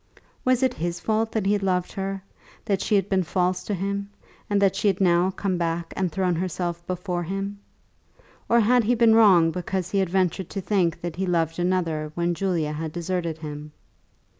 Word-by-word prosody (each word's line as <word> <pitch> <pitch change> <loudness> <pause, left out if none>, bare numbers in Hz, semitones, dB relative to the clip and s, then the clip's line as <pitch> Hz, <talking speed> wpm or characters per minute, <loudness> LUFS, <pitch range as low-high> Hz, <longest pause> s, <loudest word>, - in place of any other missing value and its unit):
Was 255 0 +2
it 260 -1 +2
his 175 -1 -3
fault 220 +3 0
that 220 -3 -1
he 200 - +3
had 205 - 0
loved 180 -2 0
her, 195 0 -4 0.4
that 195 -2 0
she 210 - +1
had 195 -1 +2
been 190 -2 +2
false 180 +1 0
to 205 - -1
him, 200 +2 -3 0.4
and 205 -1 +2
that 195 -1 +3
she 210 - 0
had 195 -2 +2
now 175 -1 +3
come 190 -1 -2
back 170 0 -2
and 185 -3 -1
thrown 185 +1 0
herself 175 0 -3
before 180 -1 -2
him? 195 +3 -4 0.9
Or 235 0 +5
had 245 +3 +4
he 245 +3 +3
been 230 -1 +5
wrong 190 -7 +6
because 180 +1 -3
he 200 - +1
had 190 -3 +1
ventured 185 -1 0
to 200 - -4
think 180 -3 0
that 170 -1 -5
he 190 0 -1
loved 165 -1 0
another 170 -4 0
when 175 0 0
Julia 170 -4 -1
had 155 +1 -4
deserted 170 -1 -3
him? 150 -1 -8
185 Hz, 200 wpm, -24 LUFS, 170-200 Hz, 0.9 s, wrong